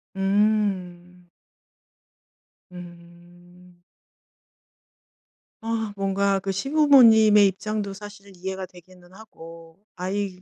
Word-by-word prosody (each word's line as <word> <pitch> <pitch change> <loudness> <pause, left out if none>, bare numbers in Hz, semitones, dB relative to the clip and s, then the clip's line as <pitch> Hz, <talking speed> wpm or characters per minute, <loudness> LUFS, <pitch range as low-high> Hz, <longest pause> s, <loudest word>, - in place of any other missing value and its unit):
음. 195 -3 -2 1.4
음. 175 0 -16 1.8
아 225 -2 -4
뭔가 195 0 -1
그 195 +1 -4
시부모님의 225 -4 +4
입장도 205 +1 -4
사실 205 0 -13
이해가 190 +1 -6
되기는 180 0 -19
하고 165 -4 -15
아이 190 0 -5
195 Hz, 150 characters per minute, -23 LUFS, 180-210 Hz, 1.8 s, 시부모님의